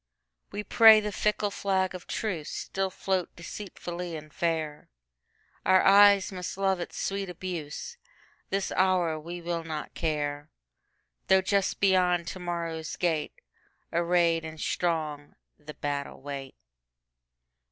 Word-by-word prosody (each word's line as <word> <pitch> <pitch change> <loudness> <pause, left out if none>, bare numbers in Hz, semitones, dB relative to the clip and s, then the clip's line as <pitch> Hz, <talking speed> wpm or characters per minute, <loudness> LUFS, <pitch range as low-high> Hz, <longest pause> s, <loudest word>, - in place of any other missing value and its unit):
We 205 +1 -5
pray 220 +1 +8
the 210 0 -3
fickle 210 0 0
flag 190 -2 0
of 185 - -9
truceStill 190 0 -3
float 185 -2 -2
deceitfully 175 -1 -6
and 155 -1 -9
fair; 160 -3 -2 0.7
Our 185 - +5
eyes 200 0 +7
must 180 0 -5
love 195 -1 +1
its 175 - -6
sweet 195 -1 -2
abuse; 180 - -6 0.5
This 195 0 -1
hour 180 -4 +2
we 170 +3 -7
will 170 -1 -2
not 155 -2 -5
care, 145 -2 -2 0.8
Though 190 0 +5
just 195 0 +1
beyond 180 -3 +3
to 185 - -7
morrow's 170 -2 -4
gate, 160 -4 -1 0.5
Arrayed 170 -1 +2
and 160 0 -8
strong, 155 -5 -2 0.2
the 150 0 -10
battle 145 -1 -4
wait. 135 -1 -7
175 Hz, 120 wpm, -28 LUFS, 160-190 Hz, 0.8 s, pray